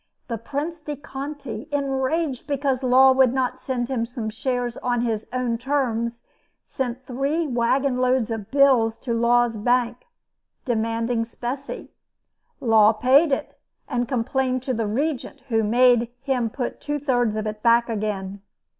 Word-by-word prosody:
The 230 -2 -3
Prince 295 +7 -4
de 295 -1 -5
Conti, 275 -4 -7
enraged 275 0 -1
because 275 -2 0
Law 260 +1 +6
would 260 -2 +4
not 255 -1 -1
send 255 -2 -2
him 240 -3 -1
some 230 -3 -5
shares 245 +1 -2
on 245 -1 0
his 225 -3 -2
own 245 -2 -1
terms, 235 -3 -1 0.4
sent 255 -1 -4
three 275 +6 -1
wagon 255 +1 +1
loads 255 -2 +2
of 220 -3 -4
bills 260 -5 +4
to 240 - -3
Law's 235 0 +2
bank, 245 - 0 0.6
demanding 230 0 0
specie. 245 +4 -6 0.7
Law 220 -2 +5
paid 265 +8 +4
it, 270 - -2 0.3
and 245 -2 -1
complained 255 +1 0
to 260 - -1
the 225 -2 -1
Regent, 275 +4 -2
who 225 -1 +2
made 240 +1 +4
him 260 -4 0
put 245 +2 -4
two 295 0 -2
thirds 245 -6 +1
of 215 0 -2
it 215 0 -4
back 235 0 +4
again. 200 -3 -3
245 Hz, 145 wpm, -23 LUFS, 230-270 Hz, 0.7 s, Law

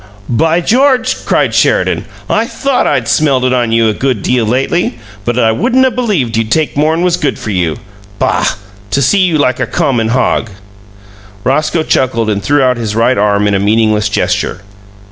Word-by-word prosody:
"By 160 +8 +1
George!" 255 +5 +1
cried - - +1
Sheridan. - - +1 0.2
"I - - 0
THOUGHT 275 -2 -1
I'd 120 -3 0
smelt 130 +2 +2
it 130 0 +1
on 120 -2 0
you 115 0 +3
a 110 - +1
good 125 -2 -2
deal 120 -3 +1
lately, 130 +3 -1 0.3
but 120 0 -1
I 115 -2 +3
wouldn't 255 - +2
'a' 260 - +2
believed 205 - -1
you'd 115 -1 -1
take 155 +5 0
more'n 160 +4 +1
was 180 -1 +1
good 140 -3 -1
for 110 - -5
you. 85 -5 -1 0.4
Boh! - - 0 0.5
To 140 - 0
see 140 +10 +2
you 180 -4 +2
like 130 -4 0
a - - -1
common 120 -5 0
hog!" 115 -1 0 0.9
Roscoe 155 +4 0
chuckled 115 -7 0
and 100 -1 -2
threw 145 +6 +1
out 125 -1 +2
his 110 -2 -3
right 115 +3 +2
arm 105 -1 +1
in 100 - +1
a 100 - +1
meaningless 105 +1 +1
gesture. 95 -1 -1
125 Hz, 185 wpm, -12 LUFS, 110-160 Hz, 0.9 s, you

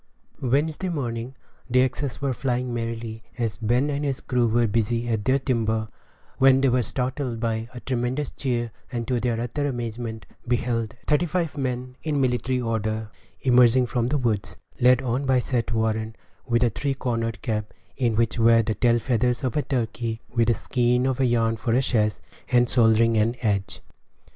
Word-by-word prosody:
Wednesday 150 +8 0
morning 125 -5 -3 0.3
the 125 +1 +4
axes 130 0 -2
were 135 -2 +1
flying 125 -1 -2
merrily, 115 -1 -4 0.2
as 115 -4 -2
Ben 120 +6 +1
and 145 +1 -2
his 140 -3 -1
crew 125 -2 +1
were 120 +1 +2
busy 115 +2 0
at 110 -3 -1
their 130 +1 +4
timber, 110 -4 -1 0.5
when 135 0 +6
they 135 0 +3
were 125 0 +2
startled 125 +1 -2
by 115 0 -2
a - - -5
tremendous 130 +2 -2
cheer, 120 -4 -2 0.2
and, 120 -2 -3
to 125 -2 +1
their 115 -1 -1
utter 135 +5 -2
amazement, 115 -3 -4 0.2
beheld 120 -2 -1
thirty 150 +3 +2
five 170 -2 -1
men, 125 -2 -3
in 150 -3 -1
military 125 0 +1
order, 110 -2 -2 0.3
emerging 125 -1 +5
from 120 -1 -1
the 145 +4 +1
woods, 115 -7 -1 0.2
led 125 +1 +5
on 130 +3 -1
by 130 -1 +4
Seth 120 -2 -1
Warren, 110 -1 -1 0.3
with 120 0 +2
a 120 - +2
three 135 +5 -2
cornered 115 -3 -2
cap, 105 -2 -2 0.2
in 120 -4 +1
which 115 +1 +1
were 115 0 +5
the 110 - -1
tail 120 +3 +3
feathers 125 +1 0
of 125 -3 -1
a 150 - +2
turkey, 115 -4 -2
with 115 -1 +2
a 115 - +3
skein 125 +2 +1
of 130 -1 0
yarn 115 -3 +2
for 115 +1 -1
a 125 - +4
sash, 105 -4 +2 0.4
and 120 -1 +4
shouldering 115 -1 +4
an 110 +3 +2
adze. 100 -3 -1
120 Hz, 175 wpm, -24 LUFS, 115-130 Hz, 0.5 s, when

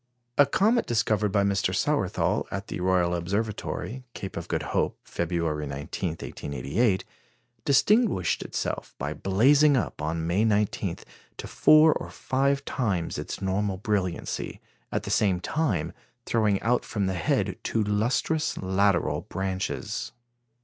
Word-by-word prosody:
A 145 +1 +6
comet 220 - +2
discovered 110 -3 +1
by 100 0 +3
Mr. 100 -1 +1
Sawerthal - - 0
at 95 +1 -5
the - - -4
Royal 90 -1 +2
Observatory, 105 +7 -3
Cape 95 - -6
of - - -5
Good - - -1
Hope, - - 0
February 80 -3 -2
19, 70 +6 -4
1888, 80 - -1 0.6
distinguished 180 - +3
itself - - -4
by 75 +3 -3
blazing 135 - +4
up, 115 - -2
on 80 +2 -2
May 90 +6 +2
19, 105 -2 +1 0.4
to - - -6
four 155 0 +6
or - - -5
five 140 +1 0
times 95 -11 -1
its - - -5
normal 95 0 0
brilliancy, 95 -3 -2 0.3
at - - -1
the - - -4
same 95 -4 +2
time 95 - -1 0.3
throwing 105 -4 +2
out 120 +3 +2
from 105 -3 -2
the 95 - 0
head 85 -3 0
two 110 - 0
lustrous 115 +9 0
lateral 95 0 +1
branches. 95 -7 -3
100 Hz, 135 wpm, -27 LUFS, 90-120 Hz, 0.6 s, A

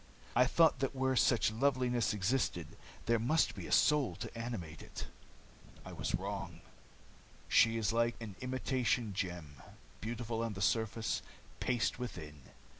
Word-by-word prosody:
I 125 +1 +5
thought 165 +3 +4
that 135 0 -1
where 130 0 +1
such 120 -3 +4
loveliness 125 -1 +1
existed, 100 - 0 0.4
there 115 -1 +3
must 145 +9 +2
be - - -7
a - - -8
soul 150 -4 +4
to - - -7
animate 110 -10 -5
it. - - -7 0.8
I - - -8
was - - -1
wrong. - - -5 0.9
She 115 0 +5
is 110 -1 0
like 115 0 +2
an 110 -4 -7
imitation 130 -3 0
gem 85 -7 -4 0.4
beautiful 115 +1 -3
on 115 -2 -2
the 95 - -7
surface, 110 +1 0 0.4
paste 125 -1 0
within. 80 - -7
115 Hz, 140 wpm, -34 LUFS, 105-125 Hz, 0.9 s, I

